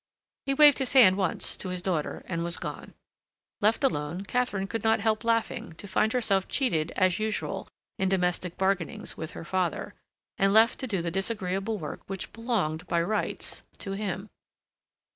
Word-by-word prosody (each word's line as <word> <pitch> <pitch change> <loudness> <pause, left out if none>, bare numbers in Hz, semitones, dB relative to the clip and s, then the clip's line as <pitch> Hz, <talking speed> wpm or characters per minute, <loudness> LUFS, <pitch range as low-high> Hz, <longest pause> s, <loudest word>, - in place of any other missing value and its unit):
He 275 - +1
waved 295 0 +7
his 265 0 +2
hand 225 -9 +8
once 190 -3 0
to 185 - -5
his 180 -1 -3
daughter, 170 -6 -2
and 170 -2 -3
was 170 0 0
gone. - - -7 0.7
Left 220 +6 +3
alone, 170 - 0
Katharine 210 -4 0
could 225 +3 -4
not 225 0 +3
help 215 +1 0
laughing 230 -6 0
to 200 - -10
find 215 +3 +2
herself 200 -6 +1
cheated 170 - 0
as 185 0 +2
usual 215 0 -2 0.3
in 190 - +2
domestic 180 -1 0
bargainings 190 -3 -1
with 160 +2 -6
her 165 - -8
father, 180 -2 -1 0.5
and 195 0 +4
left 225 +2 +5
to 260 - -3
do 195 -7 -1
the 170 - -2
disagreeable 195 +2 -1
work 155 -6 -6
which 190 -1 -5
belonged, 210 -9 -1
by 170 - +1
rights, 210 +5 0 0.2
to 195 - -5
him. 195 0 -4
195 Hz, 170 wpm, -28 LUFS, 180-225 Hz, 0.7 s, hand